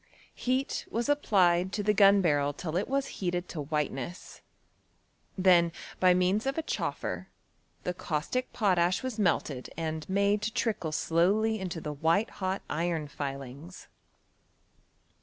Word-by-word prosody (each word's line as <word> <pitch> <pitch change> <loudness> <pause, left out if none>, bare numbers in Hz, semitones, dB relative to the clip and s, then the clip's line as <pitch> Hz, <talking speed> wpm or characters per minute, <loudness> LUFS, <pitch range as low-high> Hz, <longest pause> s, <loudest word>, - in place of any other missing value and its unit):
Heat 255 +2 -1
was 235 +3 -1
applied 185 -10 +3
to 205 - -1
the 210 +1 +3
gun* 200 -1 +6
barrel 145 -4 +2
till 155 +2 -5
it 185 - 0
was 275 +1 0 0.2
heated 175 -1 -1
to 155 - -4
whiteness; 150 +1 -4 1.0
then, 180 -3 +5 0.3
by 180 -1 +5
means 185 +6 +1
of 275 - -1
a 320 - 0
choffer, - - -3 0.6
the 180 - -1
caustic 175 +10 -2
protash 185 -2 +2
was 255 -4 -4
melted 155 -9 0
and 160 -1 -4
made 200 +2 +2
to 215 +1 -1
trickle 210 -9 -1
slowly 200 +8 +2
into 180 -3 -4
the 150 -1 -5
white 165 +9 +1
hot 190 +1 -1
iron 165 -1 -1
filings. 140 +4 -7
180 Hz, 140 wpm, -29 LUFS, 160-210 Hz, 1.0 s, gun